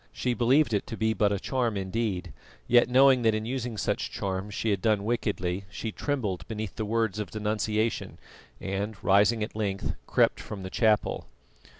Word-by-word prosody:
She 125 Hz, -, -1 dB
believed 125 Hz, +2 st, +3 dB
it 100 Hz, -, 0 dB
to 115 Hz, -, -6 dB
be 110 Hz, 0 st, +1 dB
but 105 Hz, -2 st, +2 dB
a 100 Hz, -, 0 dB
charm 120 Hz, -4 st, -1 dB
indeed, 95 Hz, -2 st, -2 dB, 0.3 s
yet 120 Hz, +1 st, +5 dB
knowing 130 Hz, 0 st, +6 dB
that 110 Hz, -2 st, +3 dB
in 110 Hz, 0 st, -2 dB
using 125 Hz, -2 st, -3 dB
such -, -, -1 dB
charms 95 Hz, +1 st, -4 dB
she 110 Hz, -2 st, 0 dB
had 100 Hz, -2 st, 0 dB
done 105 Hz, -2 st, +2 dB
wickedly, 100 Hz, -5 st, -1 dB
she 110 Hz, +3 st, -5 dB
trembled 110 Hz, -9 st, -2 dB
beneath 110 Hz, -2 st, -5 dB
the 110 Hz, -, -3 dB
words 110 Hz, -1 st, 0 dB
of 105 Hz, -, -3 dB
denunciation, 110 Hz, +1 st, -1 dB, 0.4 s
and 100 Hz, +3 st, -3 dB
rising 105 Hz, +3 st, +4 dB
at 105 Hz, -, -6 dB
length, 100 Hz, -3 st, -2 dB
crept -, -, +3 dB
from 100 Hz, -3 st, -7 dB
the 95 Hz, -, -6 dB
chapel. 110 Hz, -2 st, +1 dB
110 Hz, 180 wpm, -28 LUFS, 100-115 Hz, 0.4 s, knowing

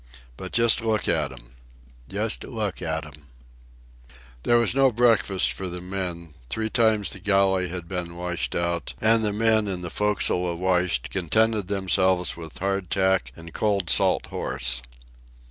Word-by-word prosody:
But 95 Hz, +7 st, -8 dB
just 115 Hz, -1 st, +3 dB
look 110 Hz, -3 st, 0 dB
at -, -, 0 dB
'm! -, -, -13 dB, 0.6 s
Just 105 Hz, +3 st, -1 dB
look 110 Hz, -6 st, -3 dB
at 80 Hz, -1 st, -2 dB
'm!" 75 Hz, -1 st, -15 dB, 1.1 s
There 120 Hz, -, +3 dB
was 120 Hz, -1 st, +1 dB
no 135 Hz, 0 st, +4 dB
breakfast 115 Hz, -5 st, +2 dB
for 95 Hz, -, -5 dB
the 90 Hz, 0 st, -5 dB
men. 90 Hz, -3 st, -5 dB, 0.2 s
Three 110 Hz, -, -2 dB
times 110 Hz, -4 st, +2 dB
the 100 Hz, -, -7 dB
galley 95 Hz, -2 st, +2 dB
had 85 Hz, -1 st, -5 dB
been 85 Hz, -2 st, -4 dB
washed 90 Hz, 0 st, -3 dB
out, 85 Hz, 0 st, -1 dB
and 110 Hz, +1 st, +4 dB
the 105 Hz, -, +2 dB
men, 110 Hz, 0 st, +2 dB
in 95 Hz, -2 st, -2 dB
the 85 Hz, -2 st, -6 dB
forecastle 105 Hz, -3 st, +1 dB
awash, 90 Hz, -4 st, 0 dB
contented 105 Hz, +3 st, 0 dB
themselves 95 Hz, -2 st, +1 dB
with 80 Hz, -2 st, -9 dB
hard 95 Hz, -1 st, -2 dB
tack 95 Hz, -1 st, +1 dB
and 85 Hz, 0 st, -11 dB
cold 100 Hz, -5 st, 0 dB
salt -, -, +3 dB
horse. 60 Hz, -1 st, -1 dB
95 Hz, 155 wpm, -25 LUFS, 85-105 Hz, 1.1 s, no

